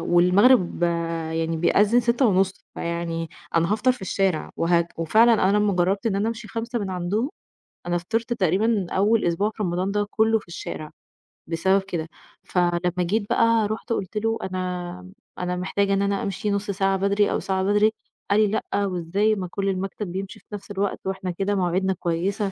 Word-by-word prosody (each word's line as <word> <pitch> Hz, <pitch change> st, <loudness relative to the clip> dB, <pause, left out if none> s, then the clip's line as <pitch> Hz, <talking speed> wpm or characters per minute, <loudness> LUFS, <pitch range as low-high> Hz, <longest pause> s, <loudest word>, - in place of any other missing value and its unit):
والمغرب 180 Hz, +4 st, +4 dB, 0.5 s
يعني 165 Hz, 0 st, -1 dB
بيأذّن 205 Hz, +8 st, +4 dB
18:30، 225 Hz, -6 st, +1 dB
فيعني 170 Hz, -1 st, -3 dB, 0.3 s
أنا 170 Hz, +3 st, +2 dB
هافطر 245 Hz, +4 st, +3 dB
في 250 Hz, -, -11 dB
الشارع. 190 Hz, -3 st, 0 dB
وه 170 Hz, 0 st, +2 dB
وفعلاً 220 Hz, +9 st, +4 dB, 0.2 s
أنا 205 Hz, -, +3 dB
لمّا 210 Hz, -1 st, +2 dB
جرّبت 190 Hz, +4 st, +1 dB
إن 195 Hz, -3 st, +1 dB
أنا 210 Hz, +3 st, +1 dB
أمشي 230 Hz, -2 st, -6 dB
17:00 230 Hz, +3 st, -3 dB
من 195 Hz, -3 st, -3 dB
عندهم، 195 Hz, -, -1 dB, 0.6 s
أنا 175 Hz, 0 st, +1 dB
فطرت 225 Hz, +7 st, -2 dB
تقريبًا 200 Hz, 0 st, +1 dB
أوّل 210 Hz, +4 st, +2 dB
أسبوع 175 Hz, +5 st, +1 dB
في 215 Hz, 0 st, -6 dB
رمضان 180 Hz, +1 st, -1 dB
ده 205 Hz, 0 st, 0 dB
كُلّه 220 Hz, 0 st, +3 dB
في 195 Hz, -, -17 dB
الشارع 155 Hz, -2 st, -6 dB, 0.6 s
بسبب 190 Hz, +4 st, +2 dB
كده، 170 Hz, -4 st, -4 dB, 0.4 s
فلمّا 175 Hz, -1 st, +1 dB, 0.2 s
جيت 200 Hz, +5 st, +1 dB
بقى 230 Hz, -2 st, +3 dB
رُحت 220 Hz, +2 st, -3 dB
قُلت 200 Hz, +1 st, -4 dB
له 225 Hz, +1 st, 0 dB
أنا 180 Hz, 0 st, -4 dB, 0.3 s
أنا 180 Hz, 0 st, -2 dB
محتاجة 195 Hz, +2 st, 0 dB
إن 195 Hz, -, +2 dB
أنا 200 Hz, 0 st, 0 dB
أمشي 200 Hz, +1 st, -2 dB
نُصّ 200 Hz, 0 st, -1 dB
ساعة 195 Hz, 0 st, +1 dB
بدري 200 Hz, +1 st, +2 dB
أو -, -, 0 dB
ساعة 190 Hz, 0 st, -1 dB
بدري، 205 Hz, +2 st, +3 dB, 0.4 s
قال 205 Hz, -, +4 dB
لي 215 Hz, -, +5 dB
لأ، 205 Hz, -1 st, -1 dB
وإزاي 190 Hz, +4 st, 0 dB
ما 185 Hz, -2 st, -4 dB
كُلّ 195 Hz, -1 st, -1 dB
المكتب 195 Hz, 0 st, -3 dB
بيمشي 195 Hz, +3 st, -5 dB
في -, -, -32 dB
نفس 205 Hz, 0 st, -7 dB
الوقت، 200 Hz, 0 st, -1 dB
وإحنا 190 Hz, -1 st, -3 dB
كده 195 Hz, +3 st, -1 dB
مواعيدنا 190 Hz, +1 st, +1 dB
كويسة، 190 Hz, +4 st, -1 dB
195 Hz, 175 wpm, -24 LUFS, 180-210 Hz, 0.6 s, لي